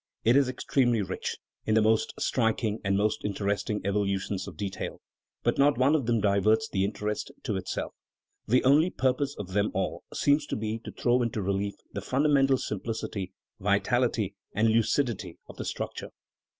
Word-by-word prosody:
It 115 +3 +5
is 140 -2 +4
extremely 125 -3 +1
rich 95 - -4 0.3
in 110 - +1
the 110 - +5
most 110 0 +2
striking 110 -2 0
and 95 0 +1
most 105 +1 0
interesting 105 +1 -1
evolutions 100 -1 -1
of - - -9
detail; 100 -1 -4 0.4
but - - +1
not 145 +1 +5
one 130 +4 +4
of 140 -7 +1
them 115 -1 +2
diverts 105 +2 +3
the 95 - 0
interest 105 +1 -2
to - - -1
itself; - - -3 0.5
the 125 +4 +3
only 145 +6 +5
purpose 135 -1 0
of 100 -3 -6
them 105 +1 +2
all 95 0 -2
seems 145 +1 +2
to - - -2
be 110 +1 -3
to - - -5
throw 125 +1 +2
into 115 -3 -1
relief 100 +1 -1 0.2
the - - -3
fun 135 +3 0
damental 135 -3 +4
simplicity, 105 -2 -4 0.3
vitality, - - +1 0.2
and 110 +3 +3
lucidity 115 +2 +1
of - - -12
the - - -5
structure. - - -4
110 Hz, 170 wpm, -28 LUFS, 100-130 Hz, 0.5 s, It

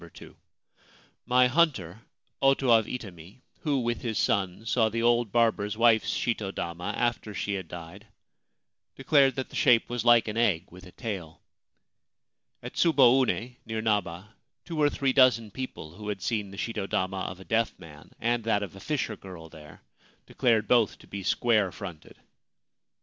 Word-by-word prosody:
2. - - -13 0.9
My 125 +1 +5
hunter, 125 - +1 0.4
Oto 135 -2 +3
of 110 -2 +5
Itami, 100 -3 -9 0.2
who, 145 -4 0
with 120 0 -2
his 115 -3 -3
son, 100 +1 0
saw 110 0 +2
the 115 +2 -2
old 120 -2 +2
barber's 110 -3 +1
wife's 115 -1 +4
shito 110 -5 -2
dama 85 -1 -4
after 120 -3 -2
she 100 - -2
had 95 -3 -4
died, 85 +6 -10 0.9
declared 135 -1 +3
that 130 -1 -4
the - - -12
shape 120 -1 +3
was 120 -1 -2
like 120 -2 +5
an 110 +1 -4
egg 95 -7 +1
with 90 +2 -13
a - - -14
tail. 90 -9 -6 1.2
At - - -7
Tsuboune, 130 -5 +3
near 110 -1 -4
Naba, 105 -1 -2 0.3
two 165 -3 -3
or 145 - +5
three 135 -2 0
dozen 125 -5 +4
people 115 -10 -7
who 105 -1 -7
had 100 -3 -4
seen 105 -4 -2
the 100 - -11
shito 105 -3 -4
dama 95 0 -1
of 90 0 -5
a 95 - -12
deaf 115 0 0
man 75 -5 -14
and 120 0 0
that 105 -2 +1
of 100 - -8
a - - -11
fisher 125 -1 -2
girl 90 -4 -11
there 75 -2 -14 0.4
declared 115 -5 +1
both 115 -3 +3
to - - -18
be 100 - -6
square 105 -1 +1
fronted. 90 -4 -10
110 Hz, 165 wpm, -27 LUFS, 95-120 Hz, 1.2 s, My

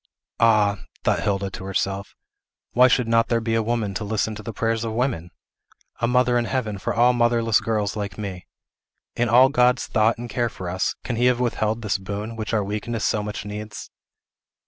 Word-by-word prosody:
"Ah," 105 -3 +3 0.2
thought - - +2
Hilda 100 -1 -1
to 95 - -8
herself, 95 0 -2 0.6
"why 125 +1 +6
should 125 -1 +2
not 115 0 +3
there 115 - +1
be 115 0 -2
a 115 - +2
woman 110 -3 -1
to 95 - -3
listen 110 +1 -1
to 105 - -8
the 110 +2 -6
prayers 115 +1 -1
of 115 -1 -3
women? 115 -8 -1 0.7
A 120 - +1
mother 125 0 +3
in 120 - -1
heaven 110 -6 -2
for - - -2
all 120 +2 +5
motherless 120 -2 +2
girls 105 -2 -1
like 105 -1 -4
me? 95 -4 -6 0.7
In 120 -1 +1
all 125 +3 +7
God's 125 -2 +3
thought 110 0 +2
and 120 +1 -6
care 120 0 -1
for 90 -4 -6
us, 95 +1 -1
can 120 - -3
he 120 - +2
have 125 -1 +2
withheld 115 -2 -1
this 105 -2 0
boon, 105 +4 -5
which 110 -1 -4
our 110 -3 +1
weakness 105 +3 -3
so 105 - +1
much 105 -1 -5
needs?" 105 +1 -7
110 Hz, 200 wpm, -23 LUFS, 105-120 Hz, 0.7 s, all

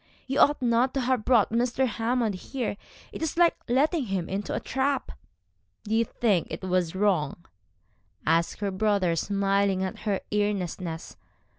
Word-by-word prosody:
You 270 +1 -1
ought 290 -2 +4
not 240 +2 +2
to 270 - +1
have 250 -2 +1
brought 230 -5 +3
Mr. 240 +3 +1
Hammond 230 -1 0
here. 230 +4 -4 0.4
It - - -7
is 320 0 -2
like 345 -1 +5
letting 285 +4 +2
him 190 -4 -2
into 195 +2 -3
a - - -1
trap.' 270 0 -1 0.7
'Do 215 - -3
you 230 +1 +3
think 205 -7 +1
it - - -6
was 185 -2 0
wrong?' 175 -5 0 0.8
asked 165 +5 +1
her 200 -1 0
brother, 190 -3 +1
smiling 195 +1 +1
at 190 - -4
her 200 -3 -1
earnestness. 185 -5 -2
210 Hz, 155 wpm, -27 LUFS, 190-250 Hz, 0.8 s, like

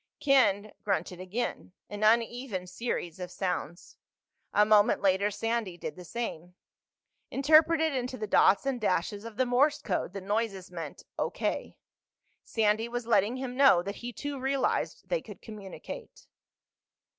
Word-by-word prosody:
Ken 215 -7 +3
grunted 180 -2 -1
again—an 205 0 -5
uneven 230 -2 +1
series 180 -3 -4
of 180 -1 -5
sounds. 180 -2 -4 0.5
A 210 - +5
moment 210 -1 +4
later 195 +1 +3
Sandy 225 -3 -2
did 155 - -6
the 180 - -10
same. 180 -4 -5 0.7
Interpreted 315 +2 +4
into 255 0 -3
the 215 - -3
dots 205 +2 +4
and 265 -3 -1
dashes 205 +2 0
of 225 -2 -9
the 255 - +3
Morse 275 +5 +3
code, 185 -2 -2
the 200 - -4
noises 200 -2 -2
meant 165 -4 -7 0.2
"O.K." - - -2 0.7
Sandy 220 0 +1
was 240 0 -3
letting 220 +1 +2
him 260 -1 -5
know 270 -10 +6
that 200 +2 -5
he 245 +1 -6
too 285 +2 -5
realized 270 0 -1
they - - 0
could - - -11
communicate. 215 - -9
215 Hz, 140 wpm, -29 LUFS, 190-250 Hz, 0.7 s, know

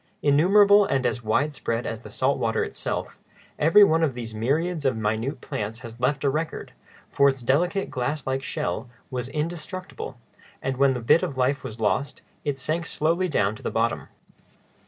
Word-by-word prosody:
Innumerable, 200 +8 +6
and 135 -9 0
as 120 0 0
wide 140 +8 +1
spread 115 -3 -2
as 110 0 -4
the 110 - -11
salt 130 +6 0
water 115 -1 +1
itself, - - -4 0.4
every 165 +7 +7
one 165 -4 +4
of 145 -6 +1
these 115 -2 -6
myriads 150 +9 0
of 130 -4 +1
minute 110 +5 -2
plants 110 +3 -4
has 115 -1 -10
left 135 +3 0
a 140 - +3
record; 155 +3 -4 0.4
for 140 0 +5
its 135 -2 -4
delicate, 175 - +1
glass 145 +4 -2
like 135 0 -1
shell 130 - -3 0.2
was 125 -1 -3
indestructible, 155 -2 -5 0.4
and 130 -1 -3
when 135 -1 +4
the 125 - -4
bit 115 +8 +4
of 135 - -3
life 130 +1 +1
was 110 +1 -7
lost, 110 +6 -1 0.2
it 145 -2 -1
sank 155 +5 -2
slowly 170 +4 0
down 105 -9 +1
to 110 - -12
the - - -2
bottom. 115 +1 -1
135 Hz, 180 wpm, -25 LUFS, 120-155 Hz, 0.4 s, every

